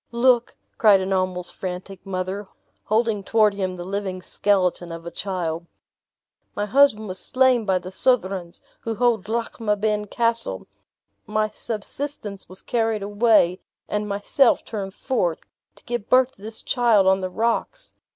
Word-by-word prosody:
"Look," 240 0 +2 0.2
cried 210 -3 +6
an 190 +1 -1
almost 185 -1 -1
frantic 185 +1 -6
mother, 190 +2 -3 0.4
holding 220 -2 +1
toward 215 0 +3
him 190 -2 -2
the 175 - -6
living 190 -1 -4
skeleton 180 -4 +1
of 165 0 -8
a 170 - -6
child; 170 -3 -3 0.9
"my 205 - -1
husband 220 -2 +4
was 185 -1 -5
slain 255 -3 +2
by 190 -2 +2
the 185 +1 -7
Southrons, 190 -6 0 0.2
who 225 -1 -4
hold 230 -4 +1
Lochmaben 215 -2 -1
Castle; 230 - 0 0.6
my 215 0 0
subsistence 215 -2 -4
was 185 +1 -8
carried 225 -3 0
away, 205 -3 +3 0.3
and 210 0 -2
myself 205 +6 +2
turned 195 -3 -5
forth, 180 - -1 0.3
to - - -19
give 240 -3 -4
birth 255 0 +5
to 195 - -24
this 220 +1 -8
child 230 -5 +3
on 190 0 +4
the 185 - -2
rocks. 235 - -2
205 Hz, 145 wpm, -23 LUFS, 185-230 Hz, 0.9 s, cried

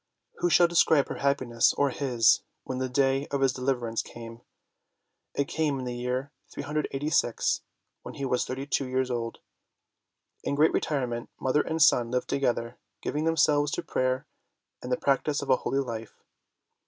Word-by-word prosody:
Who 175 - +2
shall 175 +1 +6
describe 160 -4 +3
her - - -4
happiness, 130 -4 +2
or 140 -1 +1
his, 125 -4 +3 0.2
when 130 0 -4
the 130 0 -1
day 135 +1 +1
of 140 -1 -2
his 135 -2 +3
deliverance 125 -3 -1
came? 115 0 -10 0.9
It 140 - 0
came 150 -3 0
in 130 - -5
the 125 - -3
year 125 +3 -3 0.2
386 145 -3 -1 0.4
when - - -9
he 140 - -3
was 125 -1 +1
thirty 135 +2 -4
two 140 -2 -1
years 130 0 -1
old. 115 -1 -3 1.0
In - - -1
great 155 +3 +4
retirement, 125 -5 -1
mother 135 +3 +2
and 160 0 -3
son 120 -6 +5
lived 125 +1 -2
together, 120 -3 -1 0.2
giving 150 +2 -1
themselves 150 -2 +3
to - - -2
prayer 130 +1 -1 0.6
and 125 - -6
the 125 - +2
practise 140 +1 +1
of 135 - -1
a 130 - +5
holy 135 - -2
life. 115 -4 -6
135 Hz, 165 wpm, -27 LUFS, 125-145 Hz, 1.0 s, shall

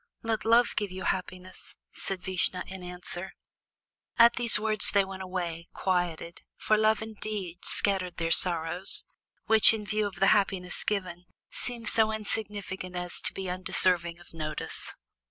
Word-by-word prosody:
"Let 225 -1 -3
Love 235 +2 +3
give 205 -1 -2
you 185 0 -8
happiness," 185 0 -5 0.2
said 190 -2 -5
Vishnu 185 -1 -1
in 190 0 -9
answer. 180 +1 -8 0.8
At 235 0 +6
these 235 -1 +7
words 215 -1 +7
they 200 -1 +2
went 190 0 -9
away 175 -3 -5
quieted, 175 -2 -3 0.2
for 215 - +1
Love 215 0 +1
indeed 210 -5 -6
scattered 190 -3 0
their 165 -1 -2
sorrows, 175 +1 +3 0.4
which, 220 0 +6
in 210 -1 -7
view 210 +1 -1
of 200 - -10
the 195 - +2
happiness 190 -3 -1
given, 180 -4 -4 0.2
seemed 235 -2 -3
so 220 0 +4
insignificant 205 -4 -5
as 180 0 -5
to - - -1
be 190 -1 -6
undeserving 180 -1 0
of 175 - -18
notice. 155 -2 -4
190 Hz, 150 wpm, -27 LUFS, 180-215 Hz, 0.8 s, these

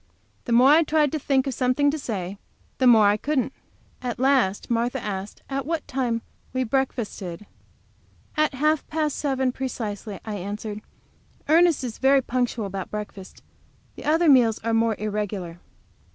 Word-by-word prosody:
The - - -4
more 245 +3 +6
I 315 +2 +7
tried 305 -2 +2
to 310 - -2
think 270 -2 +1
of 270 - -2
something 255 +4 +2
to 310 - -4
say 200 -6 -4 0.4
the 260 - +4
more 225 -3 +7
I 205 +1 +4
couldn't. 270 +1 -1 0.5
At 245 -2 -3
last 255 -7 +2
Martha 240 +3 0
asked 200 -2 -6
at 275 0 -2
what 325 -2 -2
time 240 -3 -1 0.3
we 260 0 0
breakfasted. 220 -7 -3 0.9
"At 305 -2 +1
half 305 +3 +1
past 305 -2 -1
seven, 265 -3 0
precisely," 215 -6 -5
I 215 -2 -4
answered. 205 +2 -5 0.7
"Ernest 330 -1 +4
is 235 -3 -5
very 270 0 +4
punctual 245 -3 -1
about 195 -1 -5
breakfast. 205 -2 -8 0.5
The - - -10
other 325 +3 +3
meals 245 -6 +5
are 230 0 0
more 225 -1 +2
irregular." 205 -5 -4
245 Hz, 155 wpm, -24 LUFS, 210-275 Hz, 0.9 s, I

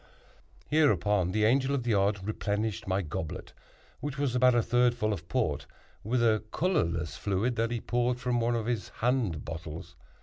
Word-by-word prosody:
Hereupon 105 - +3
the 105 +2 +2
Angel 135 +4 +3
of 130 - -2
the 120 -2 +1
Odd 100 -1 +1
replenished 105 -1 -2
my 95 +1 0
goblet 80 0 -5 0.5
(which 145 -1 -4
was 140 -3 0
about 125 0 +4
a 120 - +3
third 120 +1 +3
full 110 -2 0
of 85 -3 -7
Port) 75 - -1 0.4
with 120 +3 +1
a 110 -2 +3
colorless 85 - 0
fluid 105 +5 0
that 115 +1 +1
he 120 0 -2
poured 120 0 0
from 125 -1 0
one 120 +1 +1
of 115 -2 -2
his 115 -3 -2
hand 115 - -1
bottles. 80 0 -7
115 Hz, 175 wpm, -29 LUFS, 95-125 Hz, 0.5 s, about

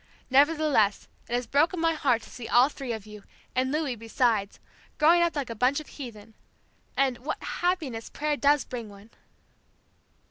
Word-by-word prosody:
Nevertheless 285 -7 +3 0.2
it - - -4
has 245 0 -1
nearly - - -29
broken 320 +5 +3
my 330 0 +2
heart 260 -7 +1
to - - -13
see 235 -2 -8
all 245 +3 +5
three 270 -4 -6
of 220 -3 -5
you, 210 -1 -11 0.3
and 260 +1 +1
Louis 295 -4 -1
besides, 225 -2 0 0.4
growing 330 +3 +5
up 340 -2 +1
like 275 -5 -3
a - - -2
bunch 250 +6 +2
of 305 - -9
heathen. 225 -5 -10 0.6
And, 265 -3 +1
what 270 +5 -5
happiness 310 -11 -2
prayer 300 0 -1
does 290 0 +3
bring 235 -4 -6
one!" 200 +2 -15
260 Hz, 175 wpm, -27 LUFS, 230-300 Hz, 0.6 s, all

